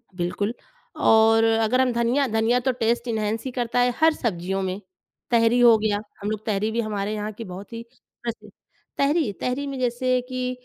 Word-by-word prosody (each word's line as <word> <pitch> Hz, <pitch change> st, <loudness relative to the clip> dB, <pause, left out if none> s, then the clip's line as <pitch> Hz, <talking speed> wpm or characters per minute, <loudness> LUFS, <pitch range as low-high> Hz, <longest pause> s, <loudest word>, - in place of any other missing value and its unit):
बिल्कुल, 190 Hz, +5 st, -2 dB, 0.4 s
और 225 Hz, 0 st, +5 dB
अगर 225 Hz, +2 st, +2 dB
हम 255 Hz, -1 st, +2 dB
धनिया 240 Hz, +4 st, +1 dB
धनिया 225 Hz, +2 st, +2 dB
तो 260 Hz, +1 st, 0 dB
टेस्ट 235 Hz, +2 st, 0 dB
एन्हांस 220 Hz, -1 st, -2 dB
ही 260 Hz, -, -3 dB
करता 245 Hz, -1 st, -1 dB
है 245 Hz, 0 st, +3 dB
हर 320 Hz, 0 st, +5 dB
सब्ज़ियों 195 Hz, -, -2 dB
में। 190 Hz, 0 st, -3 dB, 0.5 s
तहरी 230 Hz, +1 st, +4 dB
हो 235 Hz, -2 st, +7 dB
गया, 210 Hz, -1 st, 0 dB, 0.2 s
हम 205 Hz, -, -2 dB
लोग 215 Hz, 0 st, -5 dB
तहरी 215 Hz, 0 st, 0 dB
भी 230 Hz, +1 st, 0 dB
हमारे 210 Hz, -1 st, -3 dB
यहाँ 210 Hz, 0 st, -3 dB
की 230 Hz, -, -8 dB
बहुत 190 Hz, +3 st, -9 dB
ही 230 Hz, 0 st, -6 dB
प्रचलित 235 Hz, -2 st, -9 dB, 0.5 s
तहरी, 285 Hz, -3 st, +2 dB
तहरी 255 Hz, +3 st, -2 dB
में 275 Hz, -1 st, -5 dB
जैसे 255 Hz, +1 st, +1 dB
कि 255 Hz, 0 st, -2 dB
230 Hz, 185 wpm, -24 LUFS, 215-250 Hz, 0.5 s, हो